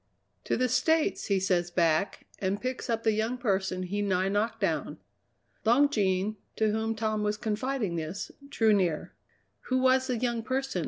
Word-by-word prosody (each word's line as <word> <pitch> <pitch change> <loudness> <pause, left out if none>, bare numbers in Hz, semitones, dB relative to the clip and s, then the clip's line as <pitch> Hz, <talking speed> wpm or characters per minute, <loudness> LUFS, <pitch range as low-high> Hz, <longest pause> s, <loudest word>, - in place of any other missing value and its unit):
'To - - 0
the 255 - +2
States,' 320 +5 +1
he 200 -2 +2
says 180 -2 +1
back, 170 +2 +1
and 195 +1 -1
picks 255 +1 -4
up 230 -1 0
the 220 - +3
young 220 +3 -1
person 190 -5 -1
he 200 +3 -2
nigh 190 -2 +1
knocked 205 +3 0
down." - - -1 0.7
Long 265 +6 +5
Jean, 200 -3 0 0.2
to 220 -1 +2
whom 220 +1 -1
Tom 215 -1 -1
was 210 0 0
confiding 220 -3 -2
this, 165 +5 -4 0.2
drew 220 -5 +3
near. 180 -6 0 0.5
"Who 255 - +1
was 260 0 +3
the 250 -3 0
young 235 -1 -1
person?" 265 -3 -2
215 Hz, 170 wpm, -29 LUFS, 190-245 Hz, 0.7 s, Long